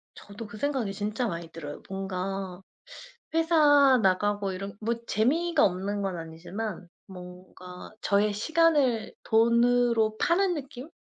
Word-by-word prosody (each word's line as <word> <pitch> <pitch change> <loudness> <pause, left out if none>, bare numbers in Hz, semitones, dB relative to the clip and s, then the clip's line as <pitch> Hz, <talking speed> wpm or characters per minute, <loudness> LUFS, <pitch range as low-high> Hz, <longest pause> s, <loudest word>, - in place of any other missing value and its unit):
저도 205 +2 -10
그 225 +1 -11
생각이 260 -6 -1
진짜 215 +4 -2
많이 170 -4 -5
들어요. 150 -3 -8
뭔가 190 -1 -4 0.7
회사 295 -5 +5
나가고 200 +1 +1
이런 195 +2 -6
뭐 230 +2 -1
재미가 310 +10 +2
없는 200 +2 -2
건 190 -3 -3
아니지만 180 +4 -6 0.2
뭔가 180 0 -11
저의 205 +1 +2
시간을 285 -1 +2
돈으로 235 -1 +3
파는 360 +2 +2
느낌? 275 -1 -8
210 Hz, 255 characters per minute, -27 LUFS, 190-255 Hz, 0.7 s, 회사